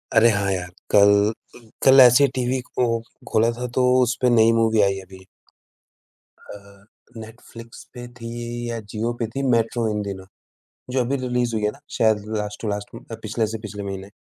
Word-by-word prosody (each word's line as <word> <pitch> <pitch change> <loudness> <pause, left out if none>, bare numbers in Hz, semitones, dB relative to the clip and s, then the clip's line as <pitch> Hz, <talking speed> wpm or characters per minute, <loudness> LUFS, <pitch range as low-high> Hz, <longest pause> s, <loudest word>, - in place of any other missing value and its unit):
अरे 115 +1 +6
हाँ 100 -2 0
यार, 90 -2 -3 0.2
कल 100 0 +6 0.4
कल 120 -2 -16 0.2
कल 135 0 +7
ऐसे 125 +3 +7
ही 140 - +4
टीवी 130 +1 -1
को 125 - -1 0.4
खोला 115 +2 +3
था 125 - -3
तो 130 - +2 0.2
उसपे 125 +1 +1
नई 115 -1 +5
मूवी 115 -1 +2
आई 100 -1 +1
अभी। 95 0 -14 1.3
अ, 100 0 -17 0.3
नेटफ्लिक्स 115 +1 -12
पे 120 -1 -8
थी 115 - -7 0.4
या 115 - -3
जियो 115 +2 -1
पे - - +1
थी, 135 - -2
मेट्रो 115 0 0
इन 105 - -2
दिनों, 95 -1 -7 0.7
जो 130 - 0
अभी 140 +3 -1
रिलीज़ 125 -2 -1
हुई 105 - -2
है 105 - +2
ना - - -28 0.2
शायद 110 -2 +2 0.2
लास्ट 105 0 -7
टू 110 - -3
लास्ट 105 0 -5
उम, - - -10 0.2
पिछले 110 +1 -1
से - - -9
पिछले 105 0 -7
महीने। 95 0 -7
115 Hz, 185 wpm, -22 LUFS, 100-120 Hz, 1.3 s, कल